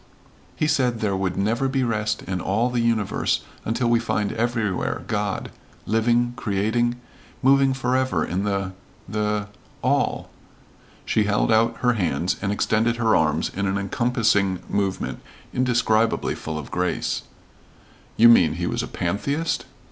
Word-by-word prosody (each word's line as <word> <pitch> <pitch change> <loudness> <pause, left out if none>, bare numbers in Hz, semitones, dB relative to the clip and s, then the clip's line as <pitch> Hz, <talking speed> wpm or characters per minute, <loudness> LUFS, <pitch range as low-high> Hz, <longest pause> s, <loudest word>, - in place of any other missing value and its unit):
"He - - 0
said 130 -6 +1
there 100 -3 0
would 95 -1 -2
never 115 +7 +1
be 135 0 0
rest 105 -3 -1
in 95 -1 -3
all 115 +6 0
the 125 - 0
universe 115 -3 0 0.2
until 115 +2 0
we 120 0 +4
find 105 -3 -1
everywhere 115 -4 -1
God, - - -2 0.3
living 120 +3 +2
creating 120 +1 0 0.5
moving 135 0 +5
forever 130 0 0
in 95 +3 -2
the 100 -2 -1 0.4
the 105 0 -1 0.4
all." - - 0 0.7
She 110 - +2
held 105 +2 +1
out 115 +1 +3
her 125 -1 +3
hands 90 -4 0
and 100 0 -1
extended 110 +3 +1
her 115 -2 +2
arms 75 0 +1
in 100 +1 -1
an 95 0 0
encompassing 105 -2 +1
movement 100 -2 -2 0.3
indescribably 115 -3 +1
full 80 -1 -5
of 75 - -7
grace. 90 0 -1 1.0
"You 115 - +8
mean 115 - +6
he - - -3
was - - -1
a - - -4
pantheist?" 140 - -2
110 Hz, 140 wpm, -23 LUFS, 100-120 Hz, 1.0 s, You